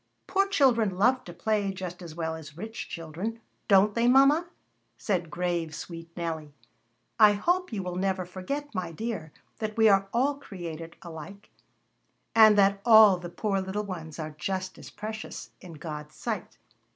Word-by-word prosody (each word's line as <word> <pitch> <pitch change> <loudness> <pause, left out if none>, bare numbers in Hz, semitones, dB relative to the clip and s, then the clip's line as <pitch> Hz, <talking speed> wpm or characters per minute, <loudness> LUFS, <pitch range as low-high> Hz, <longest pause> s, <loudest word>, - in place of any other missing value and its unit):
"Poor 390 +1 +2
children 235 - +3
love 255 +6 +3
to - - -8
play 210 -3 0
just 185 -1 -7
as 165 -3 -9
well 160 -1 -2
as 155 -2 -10
rich 220 +5 -6
children, 170 +8 -5 0.3
don't 200 +1 +5
they, 235 +2 +2
mama?" 275 +6 +5 0.5
said 180 -5 -1
grave, 170 -1 -2
sweet 165 +1 -8
Nellie. 160 -4 -4 0.6
"I 210 -1 +8
hope 350 - 0
you 205 -4 -3
will 180 0 -4
never 190 -1 0
forget, 275 +12 -5
my 180 -4 -3
dear, 180 -4 -5 0.3
that 215 0 -4
we 220 -1 +6
are 195 -1 +4
all 275 +4 +1
created 170 - -8
alike, 170 +4 -10 0.8
and 215 -2 +7
that 200 0 +4
all 220 -5 +8
the 175 -1 -7
poor 195 +2 -1
little 190 +2 -3
ones 165 -5 -7
are 155 -1 -5
just 185 -1 -3
as - - -10
precious 215 +1 -7
in 180 -3 -10
God's 150 -1 -7
sight." 220 -6 -4
195 Hz, 165 wpm, -28 LUFS, 170-220 Hz, 0.8 s, I